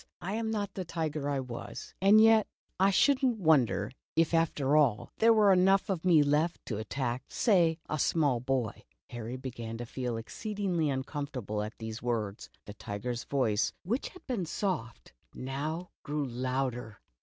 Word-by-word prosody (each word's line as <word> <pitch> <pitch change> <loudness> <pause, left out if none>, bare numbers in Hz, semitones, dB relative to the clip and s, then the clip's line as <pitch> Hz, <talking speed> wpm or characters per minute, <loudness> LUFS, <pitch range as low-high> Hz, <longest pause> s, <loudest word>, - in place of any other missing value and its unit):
I 190 +3 -4
am 225 0 -1
not 205 -3 -2
the 190 - -4
tiger 155 -4 -3
I 140 - 0
w^as, 125 -3 -7
and 200 +3 +7
yet 220 -1 +6 0.3
I 195 +1 +5
should 270 +7 +3
n't 245 -3 +2
wonder 125 - +3 0.2
if 165 0 +2
after 150 -4 +2
all, 135 -8 +2
there 230 +1 +6
were 210 -3 +6
enough 195 +2 +3
of 175 -4 -2
me 170 -5 +5
left 150 +4 0
to 110 -3 -3
attack 125 +2 -2
— - - -41
say 175 -8 +3
— - - -42
a 155 - -2
small 145 -7 +2
boy 125 -2 -2
!'' 60 - -54
Harry 120 +1 -5
began 120 -3 -6
to 120 - -5
feel 125 -1 -3
exceedingly 185 - -2
uncomforta 135 -2 -3
ble 105 0 -2
at 105 +1 -6
these 110 0 -6
words. 110 -4 -3 0.2
The 105 - -8
tiger's 115 +4 -5
voice, 115 -7 +1
which 230 +9 -1
had 365 - -14
been 210 -10 -2
soft, 155 - -3 0.2
now 150 +7 -4
grew 150 0 -2
louder. 125 -3 -3
145 Hz, 180 wpm, -30 LUFS, 120-185 Hz, 0.3 s, and